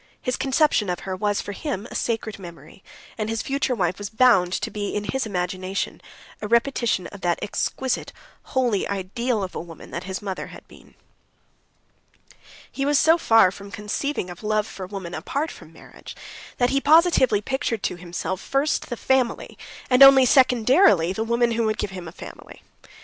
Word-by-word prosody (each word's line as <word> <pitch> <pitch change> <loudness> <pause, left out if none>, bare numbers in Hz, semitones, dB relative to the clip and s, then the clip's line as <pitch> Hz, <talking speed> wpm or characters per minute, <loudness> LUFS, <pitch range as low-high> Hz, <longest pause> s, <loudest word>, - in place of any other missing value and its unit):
His 250 -1 -2
conception 265 - +1
of 180 - -3
her 190 -1 -4
was 205 +1 -1
for - - -7
him 225 - -5
a - - -7
sacred 225 -3 -3
memory, 170 -1 -12 0.4
and 215 0 -2
his 225 0 -2
future 270 -2 -1
wife 180 -3 -1
was 205 - -5
bound 220 -6 +4
to - - -2
be 205 -1 -4
in 205 - -2
his 260 +2 -2
imagination 185 0 -3 0.4
a 210 - -3
repetition 235 -4 +1
of 200 - -11
that 175 -1 +1
exquisite, 255 +5 -2 0.4
holy 245 -6 +1
ideal 205 +4 -2
of 185 - -6
a - - -4
woman 165 -2 -12
that 170 +2 -5
his 190 0 -4
mother 195 -2 -5
had - - -13
been. - - -18 1.8
He 275 - -3
was 290 +1 +2
so 325 +4 +4
far 225 - +5
from 200 +1 -11
conceiving 210 +1 -3
of 175 - -11
love 215 -1 0
for 190 -4 -8
woman 190 -3 -7
apart 280 - -3
from - - -14
marriage - - -13 0.4
that 245 0 +2
he 275 0 +1
positively 305 - +4
pictured 230 -1 -3
to - - -1
himself 180 +1 -5
first 275 +3 -1
the 240 - -4
family, 260 -1 0 0.3
and 250 0 +3
only 270 -1 +9
secondarily 250 - +4
the 220 - -2
woman 235 +1 +1
who 230 0 0
would 215 0 0
give 200 - -3
him 180 -3 -8
a - - -8
family. - - -12
215 Hz, 180 wpm, -23 LUFS, 190-255 Hz, 1.8 s, only